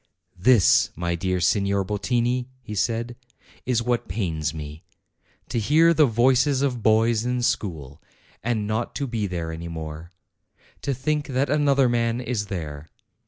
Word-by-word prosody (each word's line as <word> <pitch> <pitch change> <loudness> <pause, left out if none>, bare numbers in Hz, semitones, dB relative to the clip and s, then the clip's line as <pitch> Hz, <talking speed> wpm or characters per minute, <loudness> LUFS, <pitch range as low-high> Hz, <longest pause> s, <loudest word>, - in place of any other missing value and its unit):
"This, 115 -1 +5
my 85 +1 -2
dear 90 +1 -1
Signor 100 +2 +1
Bottini," 120 +5 0 0.2
he 105 - -7
said, 115 +3 -1 0.5
"is 120 -2 +1
what 120 0 -1
pains 85 -6 -2
me. 75 0 -8 0.7
To 115 - -1
hear 160 +9 +4
the 155 -2 +4
voices 130 +4 +3
of 125 -4 -1
boys 110 +1 +3
in 125 0 -1
school, 80 - -2 0.4
and 110 -3 -1
not 110 +3 -2
to 140 - -2
be 115 -5 -2
there 85 -3 -4
any 80 +1 -6
more; 80 0 -7 0.7
to 140 -2 -1
think 150 +3 -1
that 135 +1 0
another 140 -3 +3
man 115 0 0
is 120 -5 -3
there. 80 -6 -6
115 Hz, 150 wpm, -24 LUFS, 90-125 Hz, 0.7 s, This